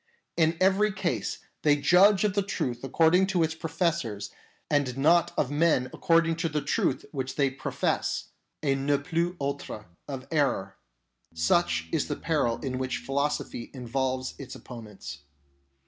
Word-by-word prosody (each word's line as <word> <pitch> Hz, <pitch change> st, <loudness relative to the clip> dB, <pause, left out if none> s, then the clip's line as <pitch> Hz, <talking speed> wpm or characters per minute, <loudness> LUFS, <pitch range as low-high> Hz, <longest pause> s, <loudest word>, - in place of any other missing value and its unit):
In 160 Hz, 0 st, +2 dB
every 195 Hz, +3 st, +3 dB
case 195 Hz, -, -3 dB, 0.2 s
they 150 Hz, -1 st, +4 dB
judge 190 Hz, +7 st, +5 dB
of 210 Hz, -2 st, +2 dB
the 200 Hz, -, +2 dB
truth 130 Hz, -11 st, -2 dB
ac 135 Hz, -, -6 dB
cording 170 Hz, +6 st, +4 dB
to 185 Hz, -4 st, +2 dB
its 160 Hz, 0 st, 0 dB
professors 160 Hz, -, -2 dB, 0.4 s
and 140 Hz, -4 st, 0 dB
not 165 Hz, +5 st, +4 dB
of 140 Hz, -, +1 dB
men 145 Hz, -4 st, +2 dB
according 165 Hz, -1 st, +2 dB
to 165 Hz, 0 st, -1 dB
the 150 Hz, -1 st, -2 dB
truth 130 Hz, -, 0 dB
which 130 Hz, -2 st, -4 dB
they 140 Hz, -2 st, +2 dB
profess, 130 Hz, -, -2 dB, 0.3 s
a 140 Hz, -2 st, +3 dB
ne 140 Hz, +1 st, +1 dB
plus 170 Hz, +4 st, -1 dB
ultra 140 Hz, -6 st, -4 dB, 0.2 s
of 135 Hz, -2 st, -6 dB
error. 130 Hz, -11 st, 0 dB, 0.6 s
Such 85 Hz, -, +2 dB
is 160 Hz, -3 st, 0 dB
the 145 Hz, -, -2 dB
peril 145 Hz, -9 st, 0 dB
in 130 Hz, -2 st, -3 dB
which 130 Hz, -1 st, -1 dB
philosophy 140 Hz, -3 st, -2 dB
involves 130 Hz, +1 st, -2 dB
its 135 Hz, -2 st, -8 dB
opponents. 110 Hz, -5 st, -9 dB
145 Hz, 150 wpm, -27 LUFS, 130-165 Hz, 0.6 s, judge